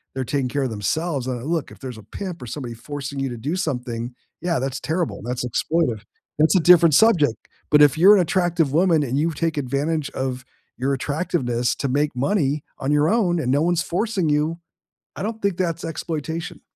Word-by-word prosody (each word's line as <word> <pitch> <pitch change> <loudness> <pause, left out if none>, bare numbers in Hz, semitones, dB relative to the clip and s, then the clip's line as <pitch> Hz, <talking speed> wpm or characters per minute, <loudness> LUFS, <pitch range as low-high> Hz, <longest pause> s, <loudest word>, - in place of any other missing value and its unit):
they're 130 - -1
taking 135 -2 -1
care 140 0 -1
of 125 - -2
themselves. 135 - -2
Uh, 125 -2 -3
look, 160 0 -2
if - - -13
there's 125 -4 -7
a - - -13
pimp 180 - -7
or 125 - -7
somebody 120 -1 -5
forcing 140 +3 -6
you 135 -1 -1
to 120 - -6
do 145 +10 -2
something, 125 -8 -3 0.3
yeah, 175 -1 0
that's 135 0 -3
terrible, 165 +1 -2
that's 125 +1 -3
exploitive. 125 -3 0 0.4
That's 160 +5 +4
a - - +6
different 170 -2 +6
subject. 170 - +4 0.3
But 150 0 +6
if 145 0 +5
you're 195 +5 +8
an 190 - +4
attractive 170 -4 +1
woman 165 -3 +3
and 135 +2 -1
you 165 +2 +2
take 160 0 -2
advantage 145 +3 -1
of 130 -1 -3 0.3
your 135 +2 0
attractiveness 130 -5 -1
to 140 - -2
make 145 +1 0
money 145 0 0 0.2
on 135 +2 -1
your 150 +1 +3
own, 180 -5 +2
and 125 -3 0
no 145 +2 +3
one's 175 0 +1
forcing 190 -3 -1
you, 150 +3 +1 0.6
I - - -5
don't 220 +1 -4
think 200 -3 0
that's 170 -3 -1
exploitation. 165 +1 -4
150 Hz, 200 wpm, -22 LUFS, 130-170 Hz, 0.6 s, you're